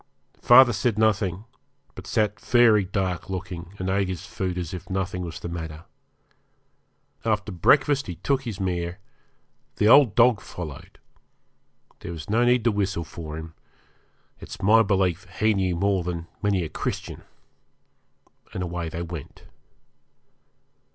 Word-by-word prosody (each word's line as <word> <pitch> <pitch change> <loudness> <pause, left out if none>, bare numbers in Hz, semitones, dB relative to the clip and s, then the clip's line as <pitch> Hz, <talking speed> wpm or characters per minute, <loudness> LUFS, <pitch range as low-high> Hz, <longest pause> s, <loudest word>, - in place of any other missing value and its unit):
Father 120 0 +7
said 105 +2 0
nothing, 105 -3 +1 0.5
but - - -10
sat 105 -2 0
very 115 -5 +4
dark 95 -2 -3
looking, 90 -1 -6
and 95 - -4
ate 95 +1 +1
his 90 -1 -5
food 90 -2 -4
as 90 0 -4
if 90 -1 -8
nothing 95 -1 -2
was 85 -2 -6
the - - -6
matter. 80 -2 -6 1.4
After 105 -2 -1
breakfast 135 - +3
he 90 - -5
took 130 - 0
his 115 -7 -6
mare, 90 -2 -2 0.8
the 105 - +2
old 120 -3 +6
dog 120 -3 +5
followed; 80 -6 -9 1.0
there 85 - -7
was 80 +4 -7
no 115 +3 +3
need 120 -1 +3
to 120 - +3
whistle 100 -4 -1
for 80 -1 -8
him 80 0 -8 0.9
it's - - -9
my 110 +4 +5
belief 95 -4 +1
he 110 0 +3
knew 95 -3 0
more 95 +1 +1
than 85 -1 -4 0.2
many 100 -3 +1
a 80 - -5
Christian - - -5 1.3
and 90 - -2
away 85 -1 -4
they 85 +2 -5
went. 85 -4 -9
95 Hz, 145 wpm, -25 LUFS, 85-105 Hz, 1.4 s, Father